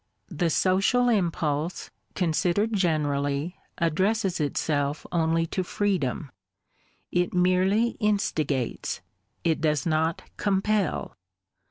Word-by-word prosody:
The 170 0 0
social 195 +9 +3
impulse, 170 -6 -1 0.2
considered 180 +5 +1
generally, 150 -3 0 0.2
addresses 190 +4 +1
itself 145 0 -1
only 165 -1 +2
to 185 - 0
freedom; 175 -8 -1 0.8
it 180 0 0
merely 185 +5 +3
instigates, 155 - -1 0.2
— - - -46
it 155 - -2
does 150 -3 +1
not 160 0 0
compel. 200 0 0
175 Hz, 90 wpm, -26 LUFS, 155-195 Hz, 0.8 s, social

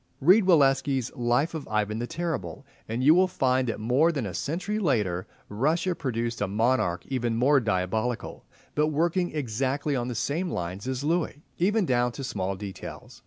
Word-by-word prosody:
Read 185 +8 +5
Walewski's 135 -6 +3
"Life 120 +7 +1
of 160 -3 -5
Ivan 105 0 -1
the 120 - -3
Terrible," 165 -3 -4 0.2
and 115 +3 -2
you 150 +4 +7
will 185 +2 +4
find 130 -7 +1
that 115 - -2
more 130 +10 +3
than 140 -8 -3
a 95 - -5
century 185 - -2
later 105 - 0 0.2
Russia 155 - 0
produced 120 -6 -3
a 105 - +1
monarch 105 -4 +1
even 120 -4 -1
more 135 +5 +4
diabolical, 110 +2 -2 0.3
but 150 +1 +2
working 170 +4 +1
exactly 135 +2 -1
on 120 -1 -1
the 125 - -4
same 165 - -1
lines 90 - -4
as 130 +1 -2
Louis, 160 -1 -1 0.2
even 205 +3 +2
down 125 -3 +1
to 135 - -6
small 95 -6 -2
details. 95 0 -9
130 Hz, 170 wpm, -27 LUFS, 115-155 Hz, 0.3 s, you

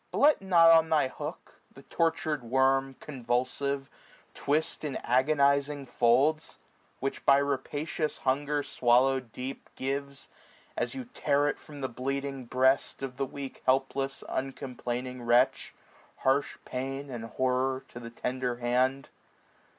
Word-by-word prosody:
But - - -4
let 295 -4 +5
not 170 -4 +6
on 160 -1 +5
thy 150 -4 +3
hook - - -8
the - - -15
tortur'd 160 -3 0
worm, 135 +2 +2
385 - - -17
Convulsive, 135 +1 -2 0.4
twist 155 +3 -1
in 145 -4 -3
agonizing 140 +2 +2
folds; 130 +6 +2 0.4
Which, 135 +1 -3
by 140 - +6
rapacious 145 +3 -2
hunger 145 +2 +1
swallowM 130 -1 +2
deep. 130 +3 -7
Gives, 140 +1 -4 0.5
as - - -2
you 260 -1 -5
tear 145 - +1
it 145 - -2
from 145 -2 -11
the 130 - -1
bleeding 135 +2 -4
breast 130 +3 +1
Of 130 -2 -5
the 135 -1 -1
weak 140 0 -8
helpless 135 +1 0
uncomplaining 125 -1 -4
wretch. 120 +2 +2 0.5
Harsh 135 +2 +1
pain 135 +2 -4
and 115 -2 -5
horror 130 +3 0
to 120 - -9
the 115 -1 -8
tender 125 +1 -3
hand. 125 +3 0
135 Hz, 135 wpm, -29 LUFS, 130-145 Hz, 0.5 s, not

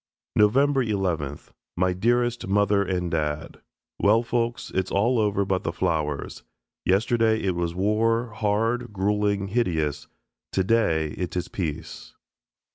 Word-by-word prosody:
November 135 +6 +4
11th. 90 - -2 0.3
My 90 +1 +2
dearest 120 +4 +1
Mother 100 0 +3
and 90 -3 -1
Dad: 75 -2 -3 0.4
Well, 110 +3 +4
folks, 120 0 -2
it's 95 0 0
all 115 +5 +2
over 100 -2 +1
but 95 -1 0
the - - -2
flowers. 75 -3 -2 0.4
Yesterday 110 +3 +2
it 95 -2 +1
was 85 -1 -2
war, 115 +4 +1
hard, 115 +3 0
gruelling, 100 0 0
hideous. 80 - -1 0.4
Today 95 -6 +2
it 90 +3 -4
is 90 - -3
peace. 80 -3 -5
100 Hz, 120 wpm, -25 LUFS, 90-115 Hz, 0.4 s, November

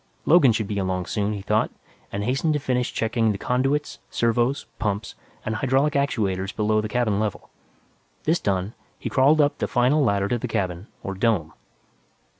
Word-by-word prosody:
Logan 150 -6 +6
should 110 -1 -1
be 100 -1 -2
along 95 -1 -1
soon, 105 +2 -1
he 100 -2 -6
thought, 105 +2 +1 0.4
and 100 - -3
hastened 135 +7 +1
to 150 - 0
finish 125 -3 -1
checking 115 0 +1
the 100 - -3
conduits, 135 +7 0
servos, 120 +4 +1
pumps 105 -1 -2 0.3
and 110 - -1
hydraulic 135 +5 +2
actuators 105 -9 0
below 110 0 +2
the 105 - -4
cabin 110 -4 +1
level. 105 -3 -3 0.7
This 165 +3 +2
done, 95 +1 -1 0.2
he - - -5
crawled 140 +4 +4
up 145 -1 +2
the - - 0
final 130 +5 +3
ladder 100 -4 +2
to 120 - 0
the - - -3
cabin, 90 +1 -2 0.2
or 95 - -3
"dome." 95 -6 0
110 Hz, 175 wpm, -24 LUFS, 100-130 Hz, 0.7 s, Logan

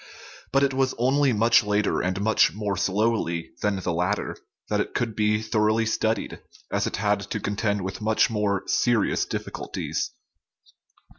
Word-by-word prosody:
But 135 0 +3
it 135 -1 +2
was 130 0 +1
only 135 +3 +3
much 115 +1 +4
later, 105 0 +1
and 95 +1 -1
much 110 +1 +3
more 105 -2 -2
slowly, 95 -3 0
than 105 -1 +1
the 95 -2 -2
latter 90 +5 -1 0.3
that - - 0
it - - -5
could 115 -3 -1
be 105 0 +1
thoroughly 110 0 +1
studied, 110 -1 -1 0.3
as - - 0
it - - -3
had - - +1
to - - -2
contend 105 0 -1
with 95 +3 -5
much 110 +1 +3
more 105 -4 0
serious 120 -4 +1
difficulties. - - -4
105 Hz, 155 wpm, -25 LUFS, 100-115 Hz, 0.3 s, much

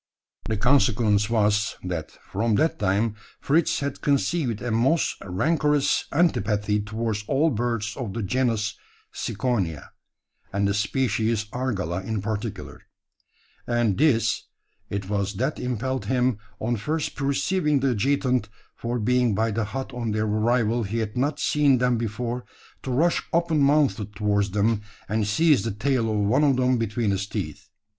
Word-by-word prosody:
The 110 - 0
consequence 110 -4 +3
was, 105 -2 +2
that, 90 -4 -4 0.2
from 110 +2 +1
that 160 +9 +1
time, 100 +3 +1 0.3
Fritz 155 +2 +1
had 140 -1 -3
conceived 140 -4 +1
a 120 -1 -3
most 130 +9 +2
rancorous 150 - +1
antipathy 110 -10 +1
towards 110 0 -3
all 155 +4 +2
birds 115 -2 -2
of 115 -7 -5
the 115 - -2
genus 115 -1 0 0.4
Ciconia 100 - -2 0.6
and 100 0 +1
the 100 - +1
species 110 0 0
Argala 95 -9 -2
in 110 +1 -2
particular; 105 +1 -5 0.9
and 120 -4 +1
this 130 -3 +2 0.4
it 100 -1 -3
was 100 0 -1
that 130 +8 -1
impelled 125 -1 -2
him, 125 -2 +1 0.2
on 120 +2 -1
first 150 +8 -2
perceiving 145 +2 +1
the 135 -1 +2
adjutant 125 -1 +1 0.3
for 120 +1 -3
being 120 -1 +2
by 110 +2 +1
the 110 +1 -1
hut 130 +5 -5
on 115 -3 -2
their 110 0 0
arrival 115 +2 +1
he 110 +1 -3
had 110 -2 -2
not 140 +4 0
seen 145 -3 +3
them 125 -1 +1
before, 120 +2 -3 0.4
to - - -6
rush 160 +7 +2
open 170 -2 +2
mouthed 140 -8 +2
towards 100 -1 +1
them, 105 +2 +1 0.3
and 110 0 0
seize 150 +4 +4
the 115 - -2
tail 115 +2 0
of 110 - 0
one 125 +9 +3
of 140 -3 +4
them 125 -1 +2
between 110 -1 0
his 100 0 -1
teeth. - - -5
115 Hz, 150 wpm, -25 LUFS, 105-130 Hz, 0.9 s, seize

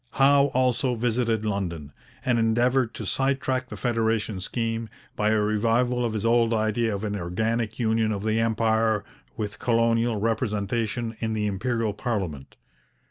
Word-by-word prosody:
Howe 140 +1 +5
also 125 0 +2
visited 115 -1 0
London, 85 -8 -3 0.3
and 120 -2 +2
endeavoured 120 +2 +2
to - - -5
sidetrack 135 -1 0
the - - -7
federation 110 -4 0
scheme 115 +3 -2 0.3
by 105 0 +1
a 110 0 +3
revival 115 +4 +1
of 115 -2 -1
his 110 0 -2
old 115 0 +3
idea 110 0 0
of 100 - -5
an 105 -1 -2
organic 110 +5 -2
union 110 -2 +1
of 100 -1 -3
the 110 +1 +1
Empire 110 -1 +1 0.3
with 105 -1 -4
colonial 115 -1 +2
representation 115 +1 -1
in 110 -1 -2
the 105 -1 -1
Imperial 110 +2 -1
parliament. 95 - -4
115 Hz, 145 wpm, -25 LUFS, 105-120 Hz, 0.3 s, Howe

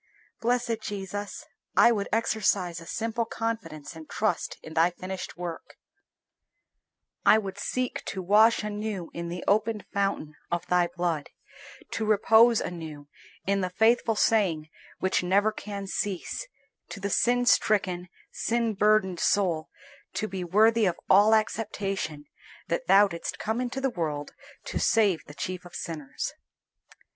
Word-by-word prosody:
Blessed 240 -1 0
Jesus! 205 0 -5 0.3
I 235 - +7
would 205 -3 -1
exercise 200 -6 +1
a 165 - -12
simple 230 0 -1
confidence 210 -10 -4
and 160 -1 -11
trust 205 -6 -1
in 160 - -9
Thy 165 +2 +4
finished 185 +1 -7
work, 175 -2 -7 1.5
I - - +7
would 195 -3 -4
seek 255 -1 -2
to 195 - -4
wash 215 +5 +5
anew 210 -4 -4
in 170 0 -5
the 175 +1 -5
opened 215 +1 +1
fountain 195 -7 -1 0.2
of 175 0 -1
Thy 180 -1 +3
blood, 175 -3 -2 0.6
to 225 - -2
repose 220 +2 +5
anew 155 -4 -7 0.4
in 195 0 +1
the 185 - -1
faithful 225 +3 +3
saying 175 -9 +2 0.3
which 190 0 +1
never 200 +4 +3
can 200 -2 -6
cease, 195 - -3 0.4
to - - -7
the 200 +1 -3
sin 245 +3 +3
stricken, 185 -6 +2 0.2
sin 230 -1 0
burdened 200 -3 +2
soul, 175 -6 +1 0.4
to 215 - -2
be 190 -3 -4
worthy 215 +4 +4
of 175 - -1
all 210 +3 +7
acceptation, 195 -8 -2 0.4
that - - -1
Thou 205 +1 +7
didst 170 -3 -5
come 225 +3 -2
into 250 +2 -3
the 270 -1 0
world 150 -6 -3 0.3
to - - -3
save 205 -7 +3
the 145 - -12
chief 185 +2 -4
of 175 -1 -12
sinners. 150 -5 -5
200 Hz, 140 wpm, -27 LUFS, 175-220 Hz, 1.5 s, I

